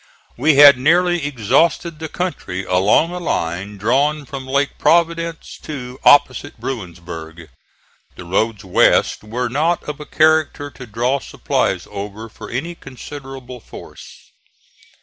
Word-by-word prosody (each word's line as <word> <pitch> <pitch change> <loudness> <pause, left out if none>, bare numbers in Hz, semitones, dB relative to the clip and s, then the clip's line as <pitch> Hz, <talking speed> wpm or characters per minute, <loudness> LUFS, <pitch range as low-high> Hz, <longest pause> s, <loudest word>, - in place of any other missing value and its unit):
We 145 +4 +3
had 140 -2 +9
nearly 175 +2 +2
exhausted 150 - +1
the 160 -1 -5
country, 100 - -4
along 100 - +3
a 180 - -5
line 100 - -3
drawn 140 +8 +1
from 135 0 -8
Lake 140 +1 -1
Providence 170 -1 0
to 130 -4 -7
opposite 135 -5 +4
Bruinsburg. 85 - -7 0.7
The 90 - -10
roads 105 +3 -1
west 95 - +3
were 120 +4 -3
not 155 +8 0
of 150 -1 -6
a 150 - -9
character 155 -2 +2
to 125 -2 -11
draw 120 +5 0
supplies - - -2
over 105 +3 -7
for - - -11
any 160 +8 -4
considerable 135 -3 -10
force. - - -13
135 Hz, 130 wpm, -19 LUFS, 105-155 Hz, 0.7 s, had